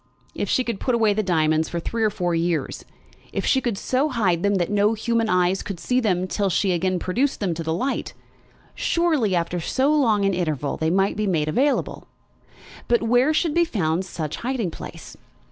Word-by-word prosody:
If - - -3
she 255 - +2
could 235 -5 -4
put 255 - 0
away 220 -3 +3
the 215 - 0
diamonds 160 -4 +1
for 170 - -3
three 230 +7 -4
or 215 - +4
four 175 -3 -2
years, 165 -3 -1 0.5
if - - -3
she 265 - +3
could 235 -6 -2
so 260 +8 0
hide 195 - +1
them 200 +1 +2
that 180 0 0
no 205 +1 +3
human 230 0 0
eyes 180 0 +2
could 195 -4 -6
see 250 +7 +1
them 185 -6 0
till 195 +1 -1
she 195 +2 +1
should - - +2
again 185 +2 0
produce 245 +11 0
them 190 -5 -1
to 165 - -5
the 160 0 -2
light, 220 +12 -2 0.6
surely, 310 - +1
after 175 +1 -1
so 265 - +1
long 225 -9 +2
an 195 - +2
interval, 155 -6 -2
they 160 - -1
might 195 +3 +1
be 215 -1 0
made 160 -5 0
available! 265 - 0 0.8
But 235 -1 +2
where 245 +5 +3
should 315 0 +1
be 340 - +4
found 180 - -1
such 160 -5 -5
hiding 235 -7 -2
place? - - -10
200 Hz, 205 wpm, -23 LUFS, 175-240 Hz, 0.8 s, or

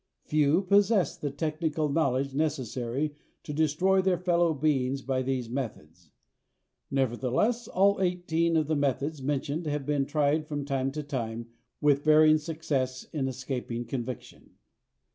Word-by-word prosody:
Few 155 +4 +2
possess 200 -2 +3
the 145 - -3
technical 155 +2 -1
knowledge 140 -3 0
necessary 135 -1 -2 0.3
to 150 - -6
destroy 160 +6 +2
their 185 -1 +2
fellow 175 -2 +2
beings 135 -3 0
by 130 0 0
these 130 -2 -2
methods. 90 - -6 0.8
Nevertheless, 135 - 0
all 200 +1 +3
eighteen 170 -2 +1
of 155 - +2
the 155 +1 0
methods 145 +1 -1
mentioned 145 +4 -2
have 145 -2 -2
been 145 -1 0
tried 150 +1 +1
from 145 -2 -3
time 135 -1 -1
to 150 0 -4
time 115 -4 -4 0.3
with 145 -1 +3
varying 155 0 +6
success 145 -5 -2
in 140 -4 -1
escaping 125 -2 -4
conviction. 120 0 -7
145 Hz, 135 wpm, -28 LUFS, 130-160 Hz, 0.8 s, varying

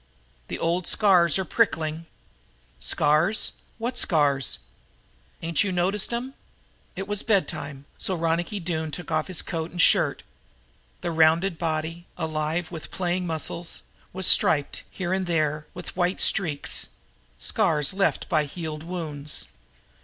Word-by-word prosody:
"The - - -4
old 170 +2 0
scars 180 -5 +4
are 190 - -1
prickling." 165 -6 0 0.7
"Scars? 155 - +2 0.3
What 240 +2 -1
scars?" 140 -5 +2 0.9
"Ain't 165 -1 +2
you 200 - -1
noticed 185 +4 +1
'em." 245 +3 -3 0.6
It 195 - -4
was 205 -1 0
bedtime, 145 - -1
so 190 - 0
Ronicky 170 +4 0
Doone 160 -3 -2
took 175 +2 -6
off 155 -1 +1
his 185 -3 -1
coat 165 -1 -3
and 175 - -9
shirt. - - +4 0.8
The 170 - -2
rounded 165 +2 +3
body, 165 +1 -2
alive 160 +1 -2
with 165 -3 -7
playing 180 0 -1
muscles, 165 +1 -2 0.3
was 190 0 -1
striped, 145 -4 +5
here 185 -1 -3
and 190 -1 0
there, 155 -2 0
with 180 - -8
white 180 +1 +1
streaks 155 -7 +1 0.5
scars 150 - +1
left 195 0 +1
by 155 -2 +2
healed 155 0 -5
wounds. 155 -4 -3
170 Hz, 130 wpm, -25 LUFS, 155-185 Hz, 0.9 s, striped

